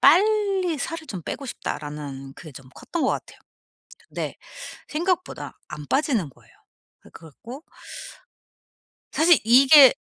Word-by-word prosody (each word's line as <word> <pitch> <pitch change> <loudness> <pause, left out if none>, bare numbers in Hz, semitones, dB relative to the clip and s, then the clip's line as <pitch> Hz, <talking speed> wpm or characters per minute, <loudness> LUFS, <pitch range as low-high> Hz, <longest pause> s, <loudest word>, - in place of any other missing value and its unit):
'빨리 390 -3 +4
살을 320 +2 -4
좀 185 -4 -6
빼고 275 - -5
싶다.'라는 145 - -6
그게 155 -1 -11
좀 130 0 -12
컸던 340 - -4
것 - - +3
같아요. - - -5 0.7
근데 - - -4 0.5
생각보다 355 +3 -2
안 150 - -8
빠지는 255 - +1
거예요. 130 - -23 0.5
그 - - -17
그래 165 - -13
갖고 250 - -10 1.5
사실 330 0 +6
이게 265 +4 +9
275 Hz, 250 characters per minute, -24 LUFS, -, 1.5 s, 이게